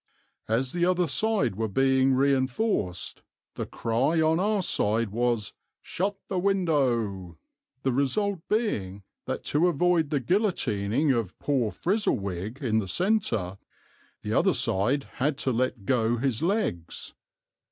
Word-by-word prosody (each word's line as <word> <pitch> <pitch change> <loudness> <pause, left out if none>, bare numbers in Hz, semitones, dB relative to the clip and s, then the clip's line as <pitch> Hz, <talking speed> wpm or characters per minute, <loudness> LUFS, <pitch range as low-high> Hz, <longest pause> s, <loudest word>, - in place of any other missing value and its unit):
As 125 +4 0
the 175 0 0
other 180 0 +3
side 165 - 0
were 110 +2 -1
being 130 +4 +3
reinforced, 130 - 0 0.3
the - - -5
cry 130 +8 0
on 160 +1 +3
our 205 0 +1
side 110 - +1
was, 115 -2 0 0.3
'Shut 195 +2 -2
the 190 - -1
window,' 125 - 0 0.5
the 130 - +2
result 185 - +1
being 100 - -1 0.2
that - - -4
to 155 +5 +2
avoid 175 -1 +2
the 145 -2 +1
guillotining 135 - +1
of 115 -7 -2
poor 130 -6 0
Frizzlewig 110 - -2
in 110 -3 +2
the 100 - -3
centre, 115 - 0 0.6
the - - -2
other - - +3
side 120 +9 +1 0.2
had 140 +1 +1
to 135 -2 0
let 120 -3 -1
go 120 -1 +1
his 130 -1 -1
legs. 165 - -2
135 Hz, 130 wpm, -27 LUFS, 110-175 Hz, 0.6 s, other